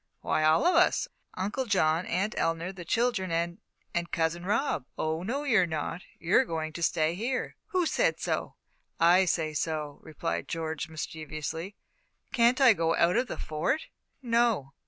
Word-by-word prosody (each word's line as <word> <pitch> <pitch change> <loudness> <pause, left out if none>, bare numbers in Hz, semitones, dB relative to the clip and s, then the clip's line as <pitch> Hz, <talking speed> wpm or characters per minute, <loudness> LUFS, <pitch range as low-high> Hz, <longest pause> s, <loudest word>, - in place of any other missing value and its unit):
"Why, 155 - 0
all 155 - +4
of 360 - +5
us 355 - +4 0.3
Uncle 205 +8 -2
John, 165 -4 +2
Aunt 195 +5 0
Eleanor, 165 +2 -1
the 185 -2 -9
children, 225 0 0
and 170 +3 -1 0.3
and 170 0 -1
Cousin 165 +1 0
Rob." 210 - 0
"Oh, 160 +1 -1
no, 250 +10 -2
you're 220 -11 +3
not! 160 +2 -3 0.2
You're 180 +10 +3
going 160 -7 -4
to 170 - -6
stay 160 -1 +2
here." 240 +8 -2
"Who 370 -4 +1
said - - +1
so?" - - -2 0.4
"I 175 +3 +6
say 160 -3 0
so," 150 -1 -3
replied 160 +1 -4
George, 160 -2 -3
mischievously. 160 +3 -5 0.6
"Can't 240 +2 +4
I 260 -4 +7
go 165 -4 +1
out 170 +1 +3
of 245 +2 +2
the - - -5
Fort?" 155 - -2 0.3
"No." 230 - +1
170 Hz, 160 wpm, -29 LUFS, 160-230 Hz, 0.6 s, I